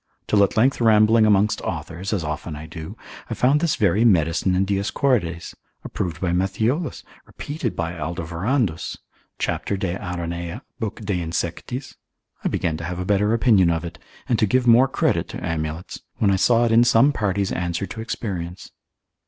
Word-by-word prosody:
till 105 -1 +4
at 100 - 0
length 125 +3 +3
rambling 110 0 +5
amongst 105 0 +3
authors 90 +4 -5
(as 100 -6 -1
often 75 +1 -4
I 75 +1 -8
do) 80 -1 -8 0.3
I - - -3
found 135 +4 +3
this 165 -1 +1
very 105 -1 +2
medicine 90 -3 +3
in 95 +1 +2
Dioscorides, 100 - 0 0.3
approved 80 -4 -4
by 90 -2 -1
Matthiolus, 110 - -1 0.2
repeated 145 -6 -5
by 85 0 -2
Alderovandus, 85 - -2 0.4
cap. - - -2
de 95 -2 -2
Aranea, 85 -1 -5 0.2
lib. 110 +1 -4
de 95 -4 -1
insectis, 85 - -4 0.5
I - - +1
began 80 -2 -1
to 85 - -7
have 90 +1 -4
a 90 - -3
better 105 +2 +2
opinion 105 -7 +4
of 85 0 -1
it, 85 -2 -8 0.3
and 120 - +1
to 110 - +3
give 125 +4 +2
more 120 +2 +6
credit 135 - 0
to - - -6
amulets, 80 +1 -4 0.2
when 100 -3 +3
I - - +3
saw 120 +5 +3
it 115 - +1
in 115 +1 +6
some 120 +4 +4
parties 100 -4 -1
answer 85 +1 -2
to 110 - -7
experience. 95 -6 -5
95 Hz, 170 wpm, -22 LUFS, 85-115 Hz, 0.5 s, more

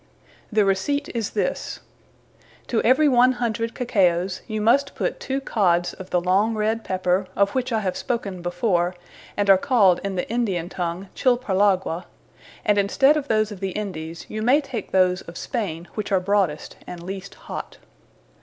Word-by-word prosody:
The 210 -1 +3
Receipt 280 +10 0
is 230 -4 -2
this. - - -2 0.9
To 230 - 0
every 265 +6 +4
100. 245 -3 +2
Cacaos, 185 -6 +1
you 215 -2 -3
must 275 +6 +2
put - - -2
two 270 +1 -2
cods 180 -9 +1
of 185 - -10
the[G] 180 -1 0
long 200 +5 +2
red 220 +1 0
Pepper, 185 0 0
of 200 0 +3
which 260 +1 -2
I 220 -1 +1
have 185 -3 -2
spoken 210 -8 -3
before, 175 0 0 0.4
and 205 -1 +1
are 195 -1 +7
called 200 -8 +4
in 195 -1 -3
the 180 - -2
Indian 200 -8 -1
Tongue, 180 +1 -4
Chilparlagua; 200 -8 +1 0.6
and 205 -1 +3
in 200 0 +1
stead 280 +5 +5
of 295 -2 -2
those 215 -2 +1
of 205 - -8
the 190 -1 -3
Indies, 170 -6 -5
you 215 - -5
may 250 +6 +4
take 265 -8 -6
those 185 0 +3
of 170 - -10
Spaine 175 -9 -3
which 210 -1 -4
are 190 - +4
broadest, 185 -5 0
& - - -22
least 185 +2 -7
hot. - - -8
200 Hz, 170 wpm, -23 LUFS, 185-235 Hz, 0.9 s, are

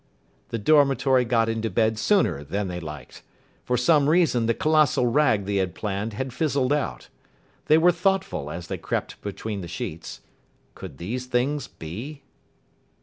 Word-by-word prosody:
The 115 - -2
dormitory 135 0 +3
got 115 -1 +2
into 115 0 -1
bed 110 +2 +1
sooner 190 - +2
than 95 +6 -3
they 90 0 -4
liked. 75 -4 -9 0.4
For 125 - 0
some 145 +3 +3
reason 155 -9 +3
the 115 - +2
colossal 155 -5 +3
rag 120 -5 +2
they 100 0 -1
had 95 -3 -1
planned 105 +1 -3
had 130 +3 -4
fizzled 140 -3 +1
out. 150 -2 -3 0.6
They 155 - +6
were 175 +2 +5
thoughtful 180 - -1
as 85 +2 -6
they - - -5
crept - - -4
between 105 0 -5
the 85 - -7
sheets. 85 -1 -6 0.5
Could 65 - -10
these 120 - -5
things 130 +4 0
be? 120 - -8
120 Hz, 155 wpm, -24 LUFS, 100-145 Hz, 0.6 s, They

